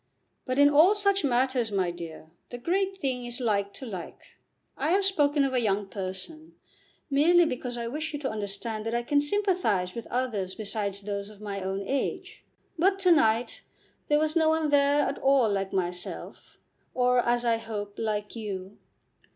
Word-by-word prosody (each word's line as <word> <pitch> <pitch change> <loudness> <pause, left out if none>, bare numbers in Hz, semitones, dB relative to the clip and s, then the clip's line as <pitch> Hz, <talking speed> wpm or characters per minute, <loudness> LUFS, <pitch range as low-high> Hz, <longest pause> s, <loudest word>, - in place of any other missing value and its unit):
"But 255 0 -2
in 285 0 +7
all 315 +8 +6
such 400 -1 +2
matters, 255 -3 +1
my 185 -3 0
dear, 165 -2 -9 0.2
the 245 - -6
great 380 +8 -1
thing 260 -7 -2
is 240 +1 -5
like 200 -4 0
to 265 - -7
like. 185 -7 -9 0.4
I - - -1
have 395 0 +3
spoken 290 -6 +3
of 270 - -2
a 250 - +2
young 205 -2 0
person, 195 - -7 0.6
merely 340 +5 +5
because 250 -4 -3
I 235 - -3
wish 305 +5 -3
you 295 - -3
to 265 - -2
understand 215 +1 -4
that 230 - -1
I 240 - 0
can 285 +4 +2
sympathise 290 - 0
with 235 - -7
others 225 -7 -2
besides 205 -2 -3
those 200 0 -4
of 210 -2 -14
my 200 -2 -5
own 190 +1 -3
age. 275 +6 -3 0.4
But 385 +3 +3
to 365 -2 +4
night 235 -7 +2 0.5
there 295 - +3
was 310 +1 0
no 320 -1 +4
one 315 -1 +1
there 285 0 +4
at 280 - -2
all 270 -3 +4
like 195 -1 -1
myself, 180 -1 -4 0.4
or, 250 0 +3
as 240 0 +1
I 230 -1 +3
hope, 210 -3 -6
like 210 -1 -2
you. 200 -3 -6
240 Hz, 180 wpm, -27 LUFS, 205-290 Hz, 0.6 s, in